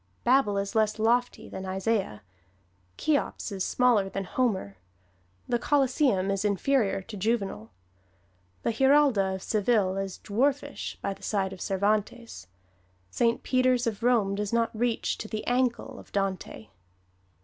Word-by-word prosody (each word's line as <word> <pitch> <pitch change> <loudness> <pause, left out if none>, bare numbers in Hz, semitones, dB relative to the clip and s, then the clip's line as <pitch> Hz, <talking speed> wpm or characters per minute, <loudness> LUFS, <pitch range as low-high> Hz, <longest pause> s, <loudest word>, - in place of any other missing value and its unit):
Babel 245 -5 +3
is 200 +2 -2
less 220 -1 +1
lofty 240 +3 +1
than 190 - -7
Isaiah; 190 - -1 0.7
Cheops 290 -6 -1
is 195 -2 -2
smaller 235 -6 +2
than 195 0 -4
Homer; 190 - -1 0.7
the 240 -1 0
Colosseum 260 -8 +2
is 195 0 -1
inferior 205 0 +1
to 220 +2 -9
Juvenal; 195 - -2 0.9
the - - +1
Giralda 265 -7 +3
of 190 - -8
Seville 205 -3 +1
is 195 -1 -4
dwarfish 275 +6 -1
by 200 - -1
the - - -18
side 195 -2 -1
of 185 - -11
Cervantes; 210 - -1 0.6
Saint 230 - +1
Peter's 255 -1 +2
of 225 -2 -2
Rome 230 -5 +2
does 205 0 -3
not 230 -1 0
reach 235 +1 -1
to 215 - -5
the 215 0 -5
ankle 245 -1 -1
of - - -15
Dante. 190 - -3
215 Hz, 140 wpm, -27 LUFS, 195-245 Hz, 0.9 s, Babel